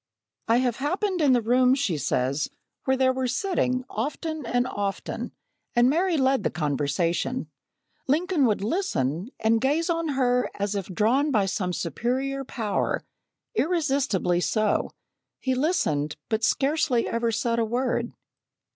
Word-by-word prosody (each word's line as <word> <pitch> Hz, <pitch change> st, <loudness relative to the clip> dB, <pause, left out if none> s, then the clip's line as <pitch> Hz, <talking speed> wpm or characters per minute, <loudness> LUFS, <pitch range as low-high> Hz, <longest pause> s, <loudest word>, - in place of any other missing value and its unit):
"I 230 Hz, +1 st, +4 dB
have 245 Hz, -2 st, +1 dB
happened 365 Hz, +6 st, -1 dB
in 280 Hz, -4 st, +5 dB
the 240 Hz, -2 st, +2 dB
room," 250 Hz, +3 st, +4 dB
she 240 Hz, -, 0 dB
says, 140 Hz, 0 st, 0 dB, 0.4 s
"where 265 Hz, 0 st, +2 dB
they 260 Hz, 0 st, +4 dB
were 260 Hz, 0 st, -1 dB
sitting, 255 Hz, -3 st, 0 dB
often 300 Hz, +4 st, -4 dB
and 245 Hz, +1 st, +1 dB
often, 200 Hz, -5 st, -3 dB, 0.4 s
and 240 Hz, +2 st, +5 dB
Mary 345 Hz, +2 st, +2 dB
led 265 Hz, -2 st, +3 dB
the -, -, 0 dB
conversation. 155 Hz, -, -1 dB, 0.6 s
Lincoln 310 Hz, 0 st, +2 dB
would 210 Hz, -3 st, 0 dB
listen, 200 Hz, -, -1 dB
and 225 Hz, 0 st, +2 dB
gaze 310 Hz, +6 st, +1 dB
on 330 Hz, -1 st, -1 dB
her 250 Hz, -1 st, +2 dB
as 200 Hz, 0 st, -2 dB
if 195 Hz, -3 st, -3 dB
drawn 230 Hz, -, +2 dB
by 215 Hz, -8 st, +2 dB
some 185 Hz, -1 st, -1 dB
superior 255 Hz, -, -2 dB
power 225 Hz, -5 st, -2 dB, 0.5 s
irresistibly 275 Hz, -, +1 dB
so; 215 Hz, +2 st, +1 dB, 0.5 s
he 260 Hz, -, -1 dB
listened, 250 Hz, -, 0 dB
but 220 Hz, 0 st, 0 dB
scarcely 275 Hz, -3 st, +2 dB
ever 230 Hz, 0 st, 0 dB
said 230 Hz, +1 st, 0 dB
a -, -, +3 dB
word." 240 Hz, +1 st, -1 dB
245 Hz, 140 wpm, -26 LUFS, 205-275 Hz, 0.6 s, in